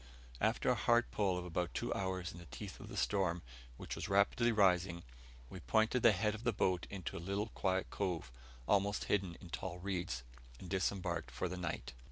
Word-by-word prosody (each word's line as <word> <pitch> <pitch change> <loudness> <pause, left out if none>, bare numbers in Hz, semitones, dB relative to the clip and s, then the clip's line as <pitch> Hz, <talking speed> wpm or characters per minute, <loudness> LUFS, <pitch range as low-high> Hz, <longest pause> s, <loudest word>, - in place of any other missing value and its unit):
After 110 +3 +2
a - - +3
hard 120 +1 +3
pull 95 -3 +1
of 90 - -4
about 90 -1 -2
two - - 0
hours 95 -1 -2
in 85 - -10
the 85 - -11
teeth - - -7
of - - -9
the - - -7
storm, 90 -4 +1 0.3
which - - -5
was - - -4
rapidly 100 +4 +4
rising, 90 -4 +3 0.4
we - - -8
pointed 110 - +2
the 115 - +8
head 105 +2 +1
of 110 +1 -7
the 120 - +3
boat 95 -3 +1
into 95 -5 -5
a - - -3
little 100 +5 -2
quiet 95 -2 0
cove, 90 -10 -2 0.4
almost 100 0 +2
hidden 95 -4 0
in 90 - -11
tall 90 +1 -4
reeds, 90 -8 -2 0.4
and 90 - -9
disembarked 90 -3 0
for 90 - -2
the 90 - -4
night. 80 -9 -4
95 Hz, 200 wpm, -36 LUFS, 85-100 Hz, 0.4 s, the